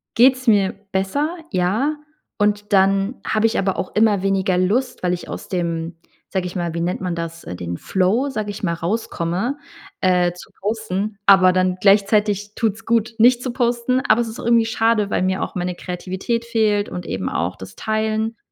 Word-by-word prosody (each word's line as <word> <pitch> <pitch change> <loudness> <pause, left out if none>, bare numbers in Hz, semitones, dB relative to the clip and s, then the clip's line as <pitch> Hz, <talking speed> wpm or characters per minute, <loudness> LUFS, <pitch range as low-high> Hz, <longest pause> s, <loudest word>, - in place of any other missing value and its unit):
geht's 255 +1 +4
mir 200 -4 +4 0.2
besser, 195 +11 0 0.2
ja. 215 +11 0 0.4
Und 205 0 0
dann 195 +4 +3
habe 220 0 +2
ich 225 - -1
aber 190 -1 0
auch - - -4
immer 210 -3 +3
weniger 190 -2 +1
Lust, 215 +6 0
weil 180 - +1
ich 175 - -4
aus - - -7
dem, 170 -2 -2 0.3
sage 190 -2 -2
ich 180 - -8
mal 170 -2 -2
wie 170 - -3
nennt 175 +2 -2
man 180 -2 -2
das, 165 0 -5
den 85 -1 -5
Flow, 200 +9 +1
sage 215 -6 -3
ich 205 +1 -7
mal, 170 -3 +1
rauskomme, 185 - -2 0.4
äh, 180 -1 +3
zu 175 - -13
posten. 210 -1 -2
Aber 190 -2 +7
dann 185 0 +1
gleichzeitig 205 0 +3
tut's 225 -1 -1
gut, 230 0 +1
nicht 245 +2 +5
zu 255 - -2
posten, 240 +1 +1
aber 240 - +4
es 230 - -3
ist 220 - -9
auch - - -7
irgendwie 235 -1 +4
schade, 225 -2 +1
weil - - 0
mir 185 0 0
auch - - -5
meine 180 0 -2
Kreativität 190 +7 -3
fehlt 215 -3 +1
und 180 -1 -6
eben 95 -1 -3
auch 85 +3 -2
das 95 0 -10
Teilen. 220 +1 -1
200 Hz, 190 wpm, -21 LUFS, 180-225 Hz, 0.4 s, Aber